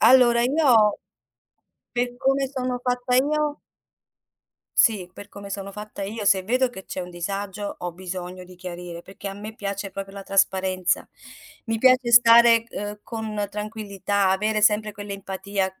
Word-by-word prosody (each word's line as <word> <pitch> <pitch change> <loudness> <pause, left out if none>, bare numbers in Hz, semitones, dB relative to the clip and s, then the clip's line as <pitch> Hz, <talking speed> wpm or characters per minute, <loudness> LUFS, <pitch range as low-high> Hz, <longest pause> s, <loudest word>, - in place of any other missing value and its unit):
Allora 240 -2 +6
io, 245 -6 +4 0.9
per 245 0 -1
come 270 +1 +2
sono 255 -2 -3
fatta 250 0 0
io 300 +2 +1 1.2
sì, 200 -7 +3
per 205 +2 -11
come 200 0 -10
sono 200 0 -5
fatta 210 0 -8
io, 210 +2 -4
se 190 -1 +4
vedo 250 +5 +1
che 190 -5 -10
c'è - - -5
un 180 0 -7
disagio 195 +3 -4
ho 175 -1 -4
bisogno 180 0 -7
di 180 0 -15
chiarire 175 -1 -8
perché 195 +2 -8
a 195 - -6
me 215 +2 -8
piace 200 -1 -4
proprio 195 0 -7
la 200 - -7
trasparenza, 190 -2 +1 0.6
mi 225 -1 0
piace 255 0 +4
stare, 235 -1 +7
uhm, 205 0 -6
con 215 -3 -4
tranquillità, 205 -2 -1
avere 210 +2 +1
sempre 210 0 +3
quell'empatia 195 -1 -4
205 Hz, 150 wpm, -24 LUFS, 190-235 Hz, 1.2 s, stare